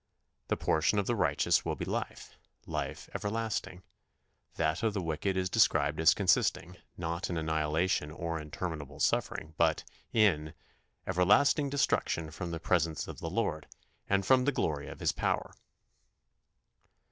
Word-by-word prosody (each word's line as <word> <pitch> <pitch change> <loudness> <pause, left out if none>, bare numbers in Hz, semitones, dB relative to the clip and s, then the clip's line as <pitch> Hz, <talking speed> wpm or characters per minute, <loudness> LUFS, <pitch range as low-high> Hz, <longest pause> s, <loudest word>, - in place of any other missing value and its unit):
The - - 0
portion 80 +6 +1
of 100 - +1
the 120 - 0
righteous 70 -8 +2
will - - -2
be - - -4
life - - -5 0.3
life - - -4
everlasting; 105 -3 -3 0.7
that 80 +2 0
of 110 -2 0
the 100 - 0
wicked 85 +4 -1
is 95 -1 +1
described 80 -8 +3
as 80 +2 +6
consisting, 90 -2 +1 0.2
not 85 +1 -3
in 85 - -2
annihilation 80 +1 0
or 85 +1 -4
in 75 0 -9
terminable 80 -3 -5
suffering, 80 0 0
but 80 -2 +2 0.3
in 80 -8 +2 0.5
"everlasting 140 - +3
destruction 85 - 0
from 90 - -5
the 85 -1 -4
presence 85 -2 0
of - - -8
the 80 - -4
Lord, 85 -6 -2 0.4
and 100 -1 +2
from 130 +1 +4
the 145 - +3
glory 75 - -2
of - - -9
his - - +2
power." - - -1
85 Hz, 145 wpm, -31 LUFS, 80-100 Hz, 0.7 s, as